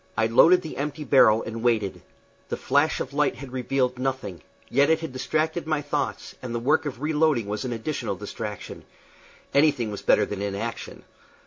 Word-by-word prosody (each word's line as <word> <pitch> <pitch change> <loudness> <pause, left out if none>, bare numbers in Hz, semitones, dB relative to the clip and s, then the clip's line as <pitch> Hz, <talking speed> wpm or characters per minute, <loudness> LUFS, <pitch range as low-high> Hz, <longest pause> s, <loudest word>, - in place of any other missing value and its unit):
I 110 - +3
loaded 170 +11 +5
the 160 - -7
empty 150 +2 -3
barrel 115 -6 +5
and 115 0 -6
waited. 110 -5 0 0.5
The - - -2
flash 145 +4 +1
of - - -5
light 150 -1 +1
had 135 -1 -9
revealed 125 0 -1
nothing, 130 - -3 0.3
yet 140 +3 +3
it 160 0 +3
had 160 -5 -6
distracted 155 +5 -1
my 155 -2 0
thoughts, 145 - -3
and 120 -2 -5
the - - 0
work 150 +5 +2
of 135 -1 -6
reloading 155 -6 +2
was 105 +4 -4
an 125 - -3
additional 115 -3 -3
distraction. 105 +1 -7 0.7
Anything 140 -6 +3
was 100 - -6
better - - +4
than 105 -1 -5
inaction. 100 +3 -5
130 Hz, 180 wpm, -25 LUFS, 115-150 Hz, 0.7 s, loaded